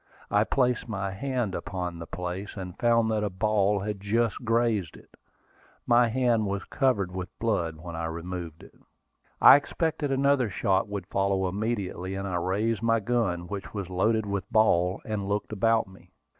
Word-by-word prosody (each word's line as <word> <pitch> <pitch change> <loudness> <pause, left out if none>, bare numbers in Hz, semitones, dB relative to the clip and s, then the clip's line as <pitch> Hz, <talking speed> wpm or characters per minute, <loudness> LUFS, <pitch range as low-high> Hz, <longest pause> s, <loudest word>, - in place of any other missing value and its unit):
I 105 +1 +3
placed 125 -2 0
my 100 -2 -2
hand 125 -1 -2
upon 90 -3 -4
the 85 - -7
place, 90 +4 -5
and 90 -2 -6
found 115 -1 +3
that 105 -1 0
a 105 - 0
ball 100 0 +1
had 105 0 -4
just 115 +4 0
grazed 115 -6 +1
it. - - -19 0.7
My 120 0 +5
hand 115 -2 +1
was 100 0 -2
covered 105 -9 0
with 90 -1 -5
blood 90 -8 -1
when 85 +1 -8
I 85 0 -3
removed 85 0 -6
it. - - -15 0.7
I - - +10
expected 155 0 -2
another 135 -3 +2
shot 95 0 +1
would 100 -3 -5
follow 95 0 0
immediately, 95 -2 -3
and 95 0 -3
I 90 -2 -1
raised 105 +5 0
my 115 0 +2
gun, 100 -6 -1
which 100 +1 -6
was 95 -3 -4
loaded 110 +4 +1
with 100 -1 -4
ball, 90 -4 +3
and 100 -3 -3
looked 105 +1 -2
about 115 +1 +2
me. 95 0 -17
100 Hz, 170 wpm, -27 LUFS, 95-115 Hz, 0.7 s, I